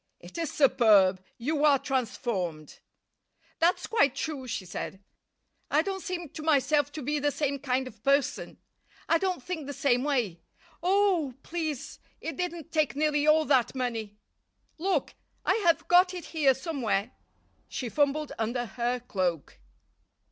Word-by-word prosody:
"It -, -, -13 dB
is 330 Hz, -4 st, -2 dB
superb. 205 Hz, -9 st, +4 dB
You 290 Hz, +5 st, -1 dB
are 290 Hz, -2 st, +6 dB
transformed." 220 Hz, -, -3 dB, 0.8 s
"That's 340 Hz, +2 st, +2 dB
quite 285 Hz, -, +2 dB
true," 280 Hz, -3 st, -4 dB
she 225 Hz, -5 st, -4 dB
said. 190 Hz, +2 st, -6 dB, 0.7 s
"I 305 Hz, +2 st, +3 dB
don't 385 Hz, 0 st, -3 dB
seem 350 Hz, -4 st, -4 dB
to 315 Hz, -, -8 dB
myself 290 Hz, -1 st, +2 dB
to 305 Hz, -, -6 dB
be 295 Hz, +3 st, 0 dB
the 290 Hz, +1 st, +2 dB
same 285 Hz, -1 st, -1 dB
kind 260 Hz, -1 st, 0 dB
of 225 Hz, -4 st, -13 dB
person. 280 Hz, 0 st, +1 dB, 0.5 s
I 330 Hz, -, +3 dB
don't 370 Hz, -7 st, -1 dB
think 320 Hz, -4 st, -5 dB
the 285 Hz, -, -4 dB
same 250 Hz, -2 st, +2 dB
way. 240 Hz, -, -1 dB, 0.4 s
Oh! 365 Hz, -7 st, +2 dB
please, 315 Hz, -5 st, -4 dB, 0.2 s
it 325 Hz, -, -5 dB
didn't 345 Hz, -3 st, -4 dB
take 310 Hz, -4 st, +1 dB
nearly 295 Hz, 0 st, +1 dB
all 310 Hz, 0 st, +5 dB
that 265 Hz, -3 st, +2 dB
money. 225 Hz, -5 st, -3 dB, 0.6 s
Look, 380 Hz, +3 st, 0 dB, 0.3 s
I -, -, +4 dB
have 335 Hz, -, +3 dB
got 360 Hz, +1 st, +5 dB
it 355 Hz, -, -6 dB
here 285 Hz, -5 st, +4 dB
somewhere." 250 Hz, -, -1 dB, 0.6 s
She 255 Hz, -, -4 dB
fumbled 290 Hz, +4 st, 0 dB
under 240 Hz, +2 st, -1 dB
her 240 Hz, +1 st, -2 dB
cloak. 185 Hz, -, -2 dB
280 Hz, 150 wpm, -28 LUFS, 245-315 Hz, 0.8 s, are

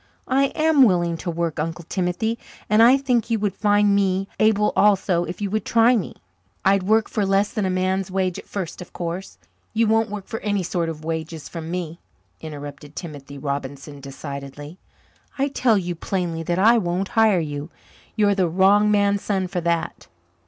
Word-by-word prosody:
"I 270 Hz, +1 st, +3 dB
am 315 Hz, -2 st, +3 dB
willing 175 Hz, -7 st, +4 dB
to 175 Hz, -, -5 dB
work, 170 Hz, -1 st, -2 dB
Uncle 165 Hz, +2 st, -3 dB
Timothy, 190 Hz, +5 st, -1 dB, 0.3 s
and 215 Hz, +1 st, +4 dB
I 245 Hz, +4 st, +7 dB
think 250 Hz, -4 st, 0 dB
you 230 Hz, -, +2 dB
would 205 Hz, -2 st, -1 dB
find 205 Hz, -1 st, +3 dB
me 195 Hz, -1 st, +1 dB
able 210 Hz, -1 st, +3 dB
also 190 Hz, -4 st, +3 dB
if 175 Hz, +4 st, -7 dB
you 200 Hz, -2 st, -2 dB
would 215 Hz, -1 st, -1 dB
try 235 Hz, +2 st, +4 dB
me. 205 Hz, -8 st, -3 dB, 0.5 s
I'd 195 Hz, 0 st, +4 dB
work 220 Hz, +4 st, +2 dB
for 215 Hz, -, -1 dB
less 195 Hz, +1 st, +2 dB
than 205 Hz, -3 st, 0 dB
a -, -, 0 dB
man's 185 Hz, +1 st, 0 dB
wages 185 Hz, -1 st, -1 dB
at -, -, -29 dB
first, 185 Hz, -5 st, -5 dB
of 180 Hz, -, -11 dB
course." 175 Hz, +2 st, -5 dB, 0.4 s
"You 230 Hz, +1 st, +3 dB
won't 225 Hz, 0 st, +2 dB
work 205 Hz, -1 st, -6 dB
for 225 Hz, -, -5 dB
any 205 Hz, -2 st, -1 dB
sort 170 Hz, -1 st, -1 dB
of 155 Hz, -1 st, -7 dB
wages 160 Hz, -1 st, -4 dB
from 165 Hz, -2 st, -7 dB
me," 170 Hz, -1 st, -4 dB, 0.4 s
interrupted 145 Hz, -1 st, -9 dB
Timothy 145 Hz, -4 st, -8 dB
Robinson 140 Hz, +1 st, -5 dB
decidedly. 140 Hz, +3 st, -8 dB, 0.6 s
"I 275 Hz, +1 st, +1 dB
tell 245 Hz, -5 st, +2 dB
you 175 Hz, -2 st, -2 dB
plainly 170 Hz, -1 st, -3 dB
that 175 Hz, +1 st, 0 dB
I 230 Hz, +5 st, +5 dB
won't 185 Hz, 0 st, -2 dB
hire 220 Hz, -4 st, +4 dB
you. 145 Hz, -1 st, -4 dB, 0.5 s
You're 205 Hz, -2 st, +3 dB
the 185 Hz, -3 st, +1 dB
wrong 195 Hz, +4 st, +4 dB
man's 200 Hz, -1 st, +2 dB
son 195 Hz, -3 st, -1 dB
for 180 Hz, -1 st, -3 dB
that. 170 Hz, 0 st, -2 dB
190 Hz, 185 wpm, -22 LUFS, 165-210 Hz, 0.6 s, I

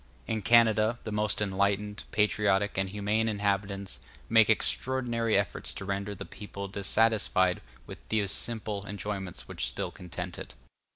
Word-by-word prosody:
In 110 Hz, -1 st, -2 dB
Canada, 110 Hz, +1 st, +4 dB
the 110 Hz, -, -5 dB
most 105 Hz, 0 st, 0 dB
enlightened, 100 Hz, +1 st, -1 dB
patriotic, 105 Hz, -1 st, +1 dB
and 95 Hz, 0 st, 0 dB
humane 105 Hz, +3 st, 0 dB
inhabitants 100 Hz, -1 st, -1 dB, 0.3 s
make 115 Hz, -1 st, +5 dB
extraordinary 120 Hz, -1 st, +2 dB
efforts 100 Hz, -1 st, -2 dB
to 95 Hz, -, -5 dB
render 100 Hz, +1 st, -3 dB
the -, -, -7 dB
people 100 Hz, -1 st, -8 dB
dissatisfied 100 Hz, -2 st, +2 dB, 0.2 s
with -, -, -10 dB
those 105 Hz, -3 st, +1 dB
simple 110 Hz, -3 st, +2 dB
enjoyments 100 Hz, -2 st, -5 dB
which -, -, -2 dB
still -, -, -4 dB
content 90 Hz, 0 st, -7 dB
it. -, -, -8 dB
105 Hz, 135 wpm, -29 LUFS, 100-110 Hz, 0.3 s, make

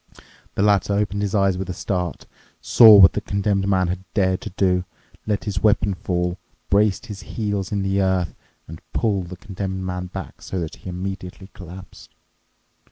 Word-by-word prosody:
The 100 Hz, -, +1 dB
latter 100 Hz, -1 st, +3 dB
opened 100 Hz, 0 st, 0 dB
his 100 Hz, 0 st, -1 dB
eyes 95 Hz, -2 st, +2 dB
with 95 Hz, -, -4 dB
a 90 Hz, -, -4 dB
start, 90 Hz, -3 st, -3 dB, 0.3 s
saw 110 Hz, -3 st, +8 dB
what 95 Hz, -2 st, +8 dB
the -, -, -2 dB
Condemned 100 Hz, -1 st, 0 dB
Man 95 Hz, -2 st, +2 dB
had 90 Hz, +1 st, -3 dB
dared 95 Hz, -2 st, +1 dB
to -, -, -6 dB
do, 90 Hz, -1 st, +1 dB, 0.4 s
let 105 Hz, -2 st, 0 dB
his 100 Hz, -2 st, -3 dB
weapon 105 Hz, -2 st, +3 dB
fall, 90 Hz, 0 st, -2 dB, 0.3 s
braced 100 Hz, +2 st, +2 dB
his 105 Hz, -4 st, -8 dB
heels 105 Hz, -2 st, -3 dB
in 100 Hz, -2 st, -1 dB
the 95 Hz, 0 st, +1 dB
earth, 95 Hz, -2 st, 0 dB, 0.3 s
and 80 Hz, 0 st, -10 dB
pulled 100 Hz, -6 st, 0 dB
the 90 Hz, -, -8 dB
Condemned 95 Hz, -1 st, -5 dB
Man 90 Hz, 0 st, -4 dB
back, 95 Hz, 0 st, -8 dB
so 95 Hz, -, -4 dB
that 80 Hz, -2 st, -5 dB
he -, -, -9 dB
immediately 95 Hz, +1 st, -6 dB
collapsed. 90 Hz, 0 st, -12 dB
95 Hz, 175 wpm, -22 LUFS, 90-100 Hz, 0.4 s, saw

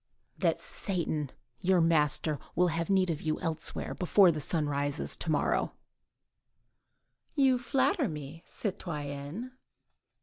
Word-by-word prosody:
"That -, -, +2 dB
Satan, 160 Hz, -, -2 dB, 0.3 s
your 185 Hz, 0 st, +3 dB
master, 155 Hz, -2 st, +3 dB, 0.2 s
will 180 Hz, +1 st, +4 dB
have 165 Hz, +2 st, -2 dB
need 190 Hz, -2 st, +3 dB
of 155 Hz, -, -4 dB
you 155 Hz, -1 st, -1 dB
elsewhere, 160 Hz, -2 st, -1 dB
before 185 Hz, 0 st, +5 dB
the 155 Hz, -2 st, -3 dB
sun 155 Hz, +2 st, 0 dB
rises 145 Hz, +1 st, -1 dB
to -, -, -3 dB
day." 150 Hz, -, +1 dB, 1.7 s
"You 265 Hz, -3 st, +4 dB
flatter 270 Hz, -, +1 dB
me, 150 Hz, 0 st, -7 dB
citoyenne." 155 Hz, -, -5 dB
165 Hz, 115 wpm, -30 LUFS, 150-190 Hz, 1.7 s, before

